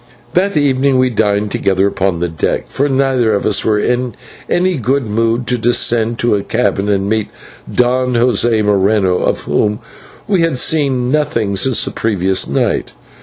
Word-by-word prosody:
That 190 -1 +1
evening 135 -2 +2
we 130 0 +2
dined 105 -2 0
together 95 0 +1
upon 95 -3 -1
deck; - - -1
for 145 +2 -1
neither 130 -5 +1
of 100 - -2
us 105 - +2
were 110 -1 +1
in 125 +3 -1 0.3
any 180 -1 +1
good 130 +2 0
mood 115 +3 0
to 125 0 -1
descend 115 -1 +1
to 120 -3 +1
the 100 - -2
cabin 105 -3 -1
and 100 -1 0
meet 110 0 -1 0.4
Don 125 +1 +1
José 120 -2 +2
Moreno, 100 -2 +2
of - - -1
whom 105 0 0 0.5
we 195 -4 +1
had 165 -5 0
seen 130 -4 +1
nothing 115 -9 0
since 120 +6 +2
the - - -4
previous 95 -4 0
night. - - -1
115 Hz, 165 wpm, -15 LUFS, 105-130 Hz, 0.5 s, evening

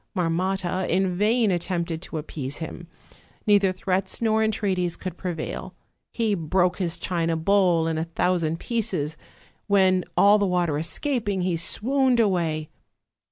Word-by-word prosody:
Marmotta 185 +1 -1
in 185 0 +1
vain 215 +2 +2
attempted 170 -2 -2
to 165 - -6
appease 145 -3 -5
him; 165 +1 -7 0.6
neither 205 -2 +4
threats 185 0 -1
nor 220 -1 +2
entreaties 190 -5 0
could 185 -2 -6
prevail; 175 -4 -5 0.4
he 225 -3 0
broke 180 +1 +1
his 175 -3 -1
china 165 -2 -1
bowl 175 -1 +3
in 160 -1 -1
a 160 - -1
thousand 165 -1 0
pieces, 195 -10 -1 0.5
when, 190 -2 +3
all 205 +1 +6
the 200 - +2
water 175 -5 0
escaping, 205 - -1
he 180 -1 0
swooned 255 +9 +1
away. 170 -7 +1
185 Hz, 135 wpm, -24 LUFS, 165-200 Hz, 0.6 s, all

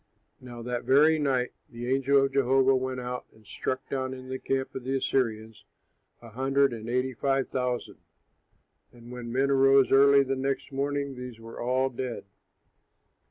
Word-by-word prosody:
Now 120 -2 -10
that 125 0 -3
very 155 +4 +4
night 130 -4 0 0.2
the 120 0 -7
angel 135 +1 +3
of 135 - -4
Jehovah 135 0 +3
went 130 0 -2
out 125 0 -5
and 110 -1 -22
struck 130 +5 -4
down 130 -1 -3
in 130 0 -11
the 130 0 -4
camp 135 0 -2
of 130 - -6
the 135 +2 -2
Assyrians 110 -5 -2 0.6
a 115 - -11
hundred 135 +3 +1
and 115 0 -7
eighty 125 +2 0
five 135 +2 0
thousand. 125 -2 -3 0.9
And 120 0 -14
when 120 -1 -7
men 135 +3 +1
arose 135 0 +5
early 140 +1 +6
the 135 0 -2
next 135 +1 -3
morning, 140 0 -2
these 125 -2 -9
were 115 0 -10
all 130 +2 +1
dead. 125 -3 -5
130 Hz, 165 wpm, -27 LUFS, 125-135 Hz, 0.9 s, early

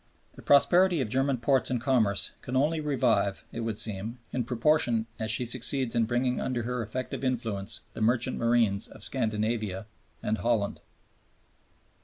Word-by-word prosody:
The - - -13
prosperity 175 +4 +4
of 125 -5 -1
German 135 +2 +1
ports 130 +2 +1
and 125 -2 0
commerce 115 -6 +1
can 125 - -5
only 155 +4 +2
revive, 115 -9 +1
it - - -6
would 115 -2 -3
seem, 110 +3 -3 0.2
in 125 - 0
proportion 120 -2 +2
as 110 0 -2
she 120 +2 +2
succeeds 125 +1 +1
in 115 -1 +2
bringing 125 +2 0
under 125 -2 -2
her 125 +1 -2
effective 125 +5 -5
influence 115 -5 -2
the - - -7
merchant 120 +3 +2
marines 115 -4 +2
of - - -12
Scandinavia 110 -4 -1 0.4
and 110 +1 0
of - - -8
Holland. 115 -4 0
120 Hz, 160 wpm, -28 LUFS, 110-130 Hz, 0.4 s, prosperity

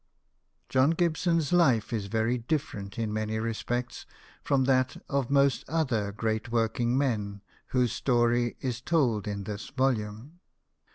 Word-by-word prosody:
John 130 +2 +3
Gibson's 165 -2 +1
life 130 -12 +3
is 105 -3 -2
very 115 +4 0
different 115 -7 -3
in 110 -2 -2
many 110 0 -2
respects 120 +2 -3 0.4
from 135 -2 +2
that 130 0 +2
of 140 -3 -1
most 140 -1 +3
other 130 -11 0
great 110 +2 -2
working 120 +2 +1
men 105 -7 -1 0.2
whose 125 -3 +1
story 120 -1 +1
is 125 -2 -3
told 125 - +1
in 100 -1 -3
this 105 +1 -6
volume. 130 +2 -2
120 Hz, 130 wpm, -28 LUFS, 110-135 Hz, 0.4 s, John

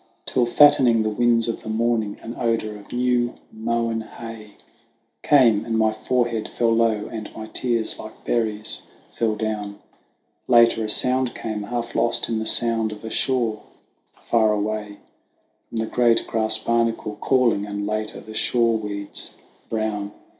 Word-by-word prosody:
Till 125 -2 +1
fattening 125 -4 +5
the 110 - 0
winds 120 +1 +2
of 115 - -3
the 110 - -8
morning, 110 -1 0
an 115 - -6
odour 115 -3 -1
of 105 -1 -13
new 120 -1 +1 0.2
mown 115 0 -1
hay 110 -2 -10 0.7
Came, 115 -7 +4
and 115 -1 -1
my 110 -1 +3
forehead 120 0 -1
fell 115 -1 +1
low, 115 -2 +2
and 110 -2 -6
my 110 - -6
tears 115 0 0
like 110 0 -11
berries 110 -2 -1 0.3
fell 110 -2 0
down; 105 -2 -3 0.7
Later 115 -2 +5
a - - -4
sound 130 +2 +2
came, 110 -2 -4
half 120 +3 -4
lost 115 - 0
in 115 -1 0
the 110 - -3
sound 115 -2 +1
of 105 +1 -9
a 110 - -5
shore 115 -5 0 0.6
far 110 -2 +2
away, 105 0 -2 0.7
From - - -6
the 110 - 0
great 120 0 +2
grass 110 -1 +1
barnacle 115 -2 -1
calling, 120 -6 +2
and 100 0 -4
later 110 +1 -3
the 110 - -11
shore 115 +1 +2
weeds 100 -1 -6 0.3
brown. 105 -2 -2
115 Hz, 155 wpm, -23 LUFS, 110-120 Hz, 0.7 s, fattening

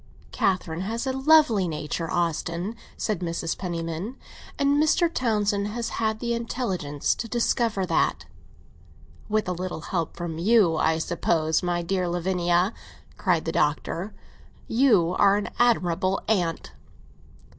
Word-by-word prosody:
"Catherine 180 -3 0
has 225 +6 -3
a 265 - -1
lovely 265 - +4
nature, 155 +1 -3
Austin," 170 +4 -1 0.2
said 215 -5 -1
Mrs. 170 -2 -2
Penniman, 170 +6 -4 0.4
"and 285 +1 +3
Mr. 335 +2 +2
Townsend 210 -4 0
has 230 +2 -3
had 220 -1 -1
the 235 0 -1
intelligence 195 - -1
to 230 - -5
discover 230 -3 0
that." - - 0 1.0
"With 215 -1 0
a - - 0
little 180 -2 -4
help 170 -1 -3
from 170 -2 -4
you, 200 -3 +4
I 160 0 +2
suppose. 160 -1 0
My 175 -1 -1
dear 180 +1 -1
Lavinia," 175 +2 +1 0.4
cried 175 -5 +1
the 165 - -1
Doctor, 165 +6 -1 0.6
"you 215 -9 +3
are 200 0 +5
an 205 - -3
admirable 190 -5 +2
aunt!" 175 -6 0
185 Hz, 130 wpm, -25 LUFS, 170-225 Hz, 1.0 s, are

